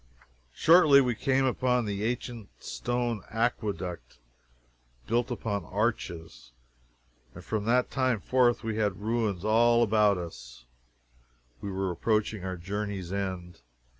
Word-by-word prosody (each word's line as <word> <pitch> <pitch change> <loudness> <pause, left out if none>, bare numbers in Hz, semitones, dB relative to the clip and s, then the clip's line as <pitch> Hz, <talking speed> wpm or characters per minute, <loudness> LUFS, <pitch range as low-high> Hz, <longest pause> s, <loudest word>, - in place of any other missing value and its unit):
Shortly 155 -4 +6
we 125 -3 +2
came 135 +3 +1
upon 125 -2 +1
an 100 -1 -3
ancient 120 -1 -3
stone 120 -3 -2
aqueduct, 100 - -3 0.9
built 120 +2 0
upon 105 -5 -3
arches, 85 - -3 0.8
and 90 - -11
from 105 -2 -2
that 125 +2 +2
time 130 -4 +1
forth 120 +3 +2
we 110 -1 -3
had 105 -3 0
ruins 105 -4 -1
all 120 +2 +4
about 105 -3 +3
us 60 -8 -9 1.0
we 100 - -4
were 95 -1 -2
approaching 105 +2 -1
our 95 -1 -4
journey's 100 0 -4
end. 90 -4 -4
105 Hz, 120 wpm, -28 LUFS, 95-120 Hz, 1.0 s, Shortly